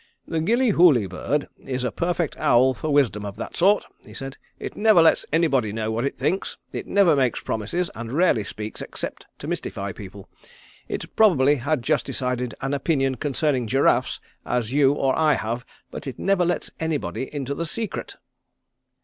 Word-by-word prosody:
"The 165 -1 -1
Gillyhooly 180 - +4
bird 140 - -2
is 130 -1 -4
a 125 - -1
perfect 170 -2 -1
owl 130 +2 +4
for 155 +5 -4
wisdom 120 -8 +2
of 100 -1 -6
that - - -7
sort," 200 +4 +3 0.2
he - - -14
said. 135 0 -6 0.2
"It - - -6
never 215 -4 +5
lets 165 -1 +4
anybody 140 -9 +2
know 110 +1 -2
what 115 +3 -1
it 140 - -3
thinks; 190 - -1 0.2
it - - -5
never 190 -6 +4
makes 130 -4 +1
promises, 170 - -2
and 115 0 -7
rarely 150 - +3
speaks 105 +1 -7
except - - -6
to - - -8
mystify 100 0 -3
people. 100 0 -10 0.6
It - - -6
probably 145 -10 +5
has 140 +2 -1
just - - 0
as - - -4
decided 125 -2 -2
an 135 +1 -2
opinion 135 -2 +1
concerning 140 -2 0
giraffes 135 +5 +2 0.2
as 120 -1 -2
you 140 -1 +4
or 135 -2 +1
I 155 -1 +4
have, 115 +3 -4 0.2
but - - -7
it 130 - -5
never 195 -2 +2
lets 175 - -1
anybody 155 -4 -2
into 140 -2 -3
the 165 +3 -3
secret." 225 +6 -5
135 Hz, 175 wpm, -24 LUFS, 120-165 Hz, 0.6 s, never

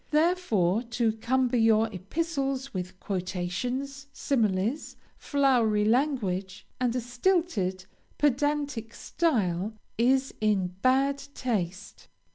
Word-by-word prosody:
Therefore 300 - +2
to 235 -1 0
cumber 250 +2 +1
your 225 -1 +4
epistles 275 - -2
with 185 0 -5
quotations, 230 +10 -3
similes, 225 -1 -1 0.2
flowery 245 -7 +2
language, 210 -7 0
and 250 -1 +1
a - - +1
stilted, 245 - 0 0.3
pedantic 285 -4 0
style, 215 - 0 0.2
is 260 +3 +3
in 205 -4 +2
bad 270 +2 +3 0.2
taste. 200 -6 -3
240 Hz, 90 wpm, -28 LUFS, 200-275 Hz, 0.3 s, your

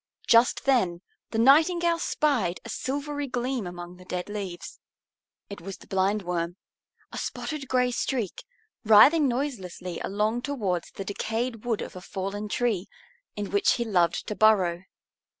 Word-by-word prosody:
Just 235 +1 +4
then 190 -11 +2 0.3
the 225 - -3
Nightingale 335 +7 +4
spied 250 - 0
a - - -7
silvery 285 +1 -3
gleam 250 -4 -2
among 175 0 -8
the 185 - -15
dead 180 +1 -4
leaves. 195 -4 -6 0.7
It 200 -3 -9
was 195 +2 -7
the - - -16
Blindworm, 185 -3 -1 0.6
a - - -5
spotted 300 -3 -4
gray 250 -1 +2
streak, 235 -4 -2 0.4
writhing 275 +8 +7
noiselessly 200 - -3
along 215 +4 -1
towards 205 - -2
the 195 - -7
decayed 225 +3 -3
wood 230 -3 0
of - - -9
a 185 - -8
fallen 195 +3 -4
tree, 215 -5 0 0.5
in 205 -1 -4
which 200 0 +3
he 235 - -1
loved 175 -6 +1
to - - -3
burrow. 190 -5 +3
215 Hz, 145 wpm, -27 LUFS, 185-255 Hz, 0.7 s, writhing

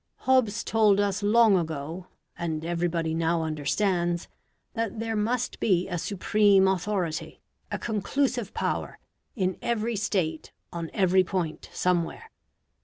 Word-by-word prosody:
Hobbes 255 -5 +2
told 215 -3 +3
us 205 0 0
long 215 0 +5
ago, 160 +1 -3 0.3
and 160 -2 -3
everybody 170 -1 -1
now 165 0 +1
understands, 170 +3 0 0.5
that 225 -2 -3
there 225 0 -2
must 230 +3 -1
be 185 -4 +2
a 180 -3 -3
supreme 200 +1 +3
authority, 185 -3 -2 0.3
a - - -1
conclusive 235 +1 -1
power, - - -2 0.4
in 185 -5 -1
every 235 0 -1
State 185 -6 -2 0.2
on 170 -1 -4
every 190 -1 +3
point 175 -4 -3
somewhere. 180 - -1
190 Hz, 120 wpm, -27 LUFS, 170-215 Hz, 0.5 s, long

